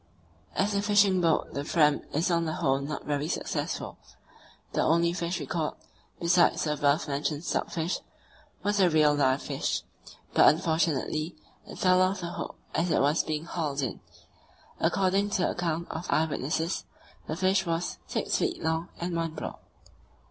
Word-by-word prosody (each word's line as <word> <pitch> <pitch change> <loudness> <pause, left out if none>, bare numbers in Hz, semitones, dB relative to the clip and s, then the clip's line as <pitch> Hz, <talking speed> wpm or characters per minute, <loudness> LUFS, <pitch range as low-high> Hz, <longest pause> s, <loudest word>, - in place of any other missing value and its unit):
As 200 +2 +1
a 200 - +1
fishing 205 -2 +4
boat 165 -2 +1
the 140 - -2
Fram 150 -1 +3
is 165 +5 +1
on 170 -1 +2
the 160 - -2
whole 135 -5 +1
not 145 +2 -5
very 145 0 -1
successful. - - -3 0.7
The - - +1
only 170 +1 +3
fish 175 0 -2
we 145 - -4
caught, 155 +2 -2 0.4
besides 170 +1 +3
the 150 - 0
above 145 +1 +2
mentioned 145 +2 -2
stockfish, 170 0 -1 0.6
was 205 0 +1
a 185 -2 +5
real 155 -2 +4
live 135 -2 +2
fish; - - -2 0.5
but, - - +7
unfortunately, 160 -1 0 0.3
it - - -9
fell 185 0 +4
off 185 0 +1
the 170 0 -4
hook - - -5 0.2
as 170 +2 +1
it - - +3
was 145 +4 +3
being 155 0 -3
hauled 150 -5 -2
in. 130 - -3 0.8
According 195 +1 +2
to 195 -3 0
the - - +2
account 170 -1 -2
of 165 +2 -5
eye 160 - +3
witnesses, 160 +3 -2 0.4
this 155 +3 -4
fish 190 0 +2
was... 165 +1 -2
six - - -1
feet 365 -2 -1
long 160 +1 -1
and 175 0 -2
one 165 -1 -2
broad. - - -6
165 Hz, 170 wpm, -28 LUFS, 150-180 Hz, 0.8 s, but